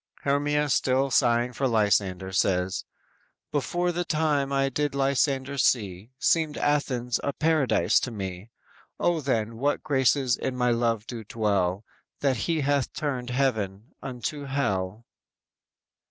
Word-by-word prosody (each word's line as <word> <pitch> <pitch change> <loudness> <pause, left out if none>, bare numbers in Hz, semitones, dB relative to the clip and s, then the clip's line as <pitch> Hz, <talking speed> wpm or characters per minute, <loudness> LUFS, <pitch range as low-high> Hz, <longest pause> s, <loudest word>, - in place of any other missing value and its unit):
"_ - - -28
Hermia 145 +1 +1
still 135 +1 +2
sighing 120 +1 +2
for 135 +3 0
Lysander 100 -4 +1
says: 95 -1 0 0.7
_"Before 175 +5 0
the 175 +1 -1
time 150 -4 0
I 135 0 +2
did 145 +1 -1
Lysander 140 0 +1
see, 100 -4 +1
Seemed 160 +1 +1
Athens 125 -5 0
as - - -2
a - - -2
paradise 140 - +2
to - - -3
me; 95 -2 -6 0.5
O 175 -2 +2
then, 115 -5 -1
what 145 +4 0
graces 130 -2 +2
in 130 - -3
my 125 -1 +2
love 115 -2 0
do 115 -2 -7
dwell 100 -2 0 0.4
That 135 -2 +2
he 160 +6 0
hath 140 -2 +1
turned 130 -5 -3
a - - -4
heaven 110 -3 -1
unto 135 +3 -5
hell." 110 -6 -2
130 Hz, 140 wpm, -26 LUFS, 110-140 Hz, 0.7 s, still